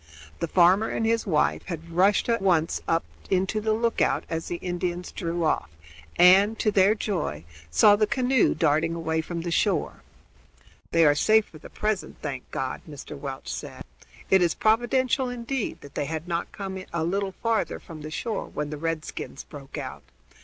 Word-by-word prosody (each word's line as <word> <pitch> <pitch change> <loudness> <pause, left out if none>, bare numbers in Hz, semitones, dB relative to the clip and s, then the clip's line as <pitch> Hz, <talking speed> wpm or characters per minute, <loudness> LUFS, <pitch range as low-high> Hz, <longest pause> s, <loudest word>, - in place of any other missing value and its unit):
The - - -1
farmer 185 +5 +4
and 225 - -1
his 230 0 +1
wife 155 -5 +2
had 170 -2 -6
rushed 190 +4 +3
at 230 -3 +1
once 170 -4 +2
up 165 0 +2 0.3
into 190 +3 +1
the 220 +1 0
lookout 230 +1 +1
as 165 0 -3
the 175 - -3
Indians 175 0 -3
drew 170 -2 -3
off 120 - 0 0.5
and, 195 +5 +6
to 215 - +1
their 200 +1 +4
joy, 170 - -3 0.3
saw 80 - +6
the 210 0 +2
canoe 255 +1 +2
darting 160 +1 +2
away 160 -1 -1
from 170 +1 -5
shore. - - 0 0.9
"They 165 -1 +4
are 145 - +6
safe 215 +8 +4
for 155 - -15
the - - -12
present, 210 -3 -2
thank 135 -4 -6
God!" 130 - -3
Mr. 145 0 -8
Welch 135 - -6
said. - - -7 0.5
"It 190 -1 +6
is 170 -2 +2
providential 250 +3 +2
indeed 245 0 -3
that 140 - -12
they - - -2
had 160 +2 -4
not 170 -1 -2
come 190 -2 -6
a 170 -1 -1
little 195 +3 -1
further 230 -1 0
from 160 -4 -11
the 155 - -6
shore 210 +7 -3
when 150 0 -4
the 150 - -4
redskins 155 -3 -4
broke 140 -2 -10
out. - - -6
175 Hz, 175 wpm, -26 LUFS, 160-215 Hz, 0.9 s, and